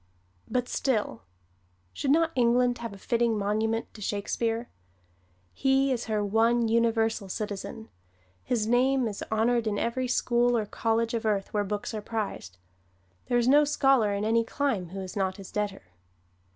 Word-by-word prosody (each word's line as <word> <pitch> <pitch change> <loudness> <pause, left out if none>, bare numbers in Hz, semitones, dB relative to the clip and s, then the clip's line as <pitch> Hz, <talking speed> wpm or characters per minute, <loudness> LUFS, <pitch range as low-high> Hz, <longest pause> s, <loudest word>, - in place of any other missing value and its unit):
But 245 +1 0
still, 215 - -1 0.7
should 275 - -3
not 325 +3 +3
England 245 0 +2
have 230 -2 -5
a 200 - -10
fitting 230 +2 +1
monument 220 +3 -1
to 215 - -12
Shakespeare? 225 +4 -2 0.9
He 270 - +2
is 245 -2 -1
her 215 -2 -1
one 230 +3 +2
universal 225 -2 +1
citizen. 210 +2 -5 0.6
His 235 -4 0
name 250 +2 +2
is 205 -2 -5
honored 230 +1 +2
in 205 -1 0
every 245 +4 -1
school 240 -1 +2
or 215 - -1
college 225 +2 -1
of 230 0 -1
earth 205 -3 -1
where 205 -1 +1
books 205 +2 -4
are 215 - -3
prized. 205 - -5 0.7
There 245 - +2
is 240 0 +2
no 290 +3 +6
scholar 270 -6 +3
in 200 +1 -1
any 230 +1 +3
clime 225 -7 -2
who 195 +2 -6
is 185 -1 -7
not 190 -2 -1
his 195 -2 -10
debtor. 210 - -3
225 Hz, 160 wpm, -27 LUFS, 210-245 Hz, 0.9 s, no